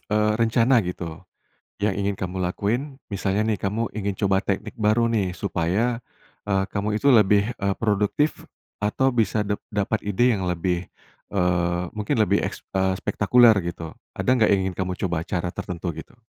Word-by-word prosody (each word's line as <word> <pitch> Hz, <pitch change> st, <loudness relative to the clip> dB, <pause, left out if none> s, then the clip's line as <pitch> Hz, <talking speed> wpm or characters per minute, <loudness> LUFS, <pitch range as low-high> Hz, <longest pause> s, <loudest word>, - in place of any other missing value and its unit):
eee, 105 Hz, 0 st, +3 dB
rencana 115 Hz, 0 st, +3 dB
gitu, 85 Hz, -2 st, -6 dB, 0.5 s
yang 100 Hz, -1 st, 0 dB
ingin 100 Hz, 0 st, -2 dB
kamu 95 Hz, 0 st, -3 dB
lakuin? 120 Hz, +10 st, -2 dB
Misalnya 100 Hz, +1 st, -1 dB
nih, 110 Hz, -3 st, 0 dB
kamu 110 Hz, +4 st, -2 dB
ingin 100 Hz, -2 st, -3 dB
coba 95 Hz, -1 st, +2 dB
teknik 105 Hz, +2 st, -3 dB
baru 110 Hz, +1 st, +2 dB
nih, 110 Hz, -5 st, 0 dB
supaya, 95 Hz, +8 st, -1 dB, 0.4 s
eee, 95 Hz, -2 st, 0 dB
kamu 105 Hz, +1 st, 0 dB
itu -, -, -3 dB
lebih, 105 Hz, +1 st, +4 dB
eee, 100 Hz, -3 st, -1 dB
produktif, 105 Hz, +7 st, 0 dB, 0.3 s
atau 130 Hz, +5 st, +1 dB
bisa 110 Hz, -2 st, +1 dB
dap 105 Hz, 0 st, -2 dB
dapat 105 Hz, +1 st, -1 dB
ide 115 Hz, +5 st, +2 dB
yang 95 Hz, -, -3 dB
lebih, 90 Hz, 0 st, -1 dB, 0.4 s
eee, 90 Hz, -2 st, +1 dB
mungkin 105 Hz, +5 st, -1 dB
lebih 105 Hz, -2 st, +3 dB
eks -, -, -5 dB
eee, 95 Hz, 0 st, +2 dB
spektakuler, 110 Hz, +4 st, +5 dB
gitu? 85 Hz, -2 st, -6 dB, 0.2 s
Ada -, -, -6 dB
nggak, 110 Hz, -4 st, +3 dB
yang 100 Hz, -1 st, +4 dB
ingin 90 Hz, -, -10 dB
kamu 90 Hz, -1 st, -2 dB
coba, 85 Hz, -3 st, -1 dB
cara 90 Hz, 0 st, -3 dB
tertentu, 85 Hz, -1 st, -4 dB
gitu? 80 Hz, +9 st, -11 dB
100 Hz, 165 wpm, -24 LUFS, 90-110 Hz, 0.5 s, spektakuler